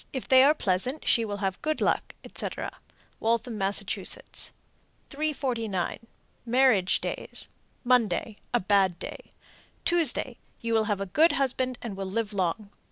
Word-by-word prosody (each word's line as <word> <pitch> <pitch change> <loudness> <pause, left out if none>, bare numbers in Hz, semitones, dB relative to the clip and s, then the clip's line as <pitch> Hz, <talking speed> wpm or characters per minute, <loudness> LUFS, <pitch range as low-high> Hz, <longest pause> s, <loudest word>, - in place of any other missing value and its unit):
If 260 - -4
they 260 0 +7
are 295 +3 +6
pleasant, 230 +7 -1
she 230 - +4
will 205 -2 -3
have 190 0 -2
good 310 0 0
luck, - - 0
etc. - - -4 0.5
Waltham, 230 0 0
Mass. 195 +1 0
349. 230 - -4 0.4
Marriage 240 -6 +3
days. - - -4 0.3
Monday 235 -3 +2
a 240 - +3
bad 190 -2 +3
day. - - -8 0.5
Tuesday 305 -7 +1 0.2
you 230 0 -2
will 220 -1 +3
have 205 -2 -1
a - - -1
good 310 - +4
husband 255 -2 0
and 225 -5 -4
will 195 -1 -4
live 215 +1 -2
long. 200 +2 -1
230 Hz, 140 wpm, -28 LUFS, 200-260 Hz, 0.5 s, they